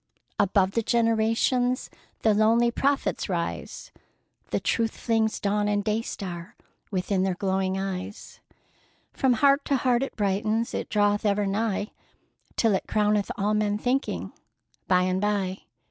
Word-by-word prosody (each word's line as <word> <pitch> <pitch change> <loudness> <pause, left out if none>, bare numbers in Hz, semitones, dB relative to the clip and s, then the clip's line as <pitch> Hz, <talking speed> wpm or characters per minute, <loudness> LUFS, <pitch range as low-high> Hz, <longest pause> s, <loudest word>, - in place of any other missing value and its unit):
Above 195 -1 +3
the 230 - 0
generations 230 +2 +1 0.3
The 220 - +4
lonely 225 +3 +3
prophets 280 +3 0
rise,— - - -4 0.6
The - - 0
Truth 225 -1 -1
flings 225 -2 0
dawn 205 0 0
and 205 0 +1
day 215 +2 0
star 175 -6 -7 0.3
Within 190 0 0
their 190 -1 0
glowing 190 0 -1
eyes; 195 +1 -5 0.7
From 265 -2 +2
heart 280 +4 +4
to 280 - +1
heart 250 -1 +2
it 275 - -3
brightens, 215 +3 0
It - - -3
draweth 205 -1 +2
ever 205 -1 +1
nigh, 205 +1 -1 0.6
Till 225 -3 +3
it 190 - -1
crowneth 210 -1 +1
all 205 +2 +1
men 210 -1 +1
thinking, 250 +5 -1 0.5
by 180 -1 +4
and 185 +1 0
by! 200 -2 -1
210 Hz, 140 wpm, -26 LUFS, 195-230 Hz, 0.7 s, The